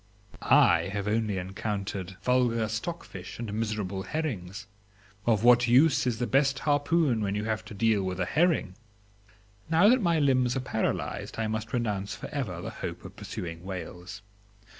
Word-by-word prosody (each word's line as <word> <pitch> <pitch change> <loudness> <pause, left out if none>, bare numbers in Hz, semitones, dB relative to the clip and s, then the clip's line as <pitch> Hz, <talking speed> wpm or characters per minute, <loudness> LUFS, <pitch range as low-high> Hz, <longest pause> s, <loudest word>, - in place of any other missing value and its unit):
I - - +4
have 100 0 -3
only 110 -2 0
encountered 95 0 -4
vulgar 120 -3 +2
stockfish 115 - -6
and 115 -3 -5
miserable 105 -3 -2
herrings. 105 - -4 0.6
Of 110 -2 +3
what 120 0 +6
use 130 +3 +4
is 120 -3 0
the 125 - -1
best 135 +2 +2
harpoon 145 -4 +1
when 100 -1 -1
you 105 - -2
have 110 0 -2
to 110 -1 -9
deal 110 0 +2
with 95 -1 -3
a 95 - +1
herring? 160 - +1 1.0
Now 165 +5 +5
that 255 +1 +4
my 170 -4 +2
limbs 130 -4 +2
are - - -1
paralysed 110 -3 -2
I 110 - -1
must 110 +1 -3
renounce 105 -4 -2
for - - -8
ever 105 - -4
the - - -5
hope - - -6
of - - -10
pursuing 85 -1 -6
whales. 90 0 -7
110 Hz, 160 wpm, -28 LUFS, 100-130 Hz, 1.0 s, what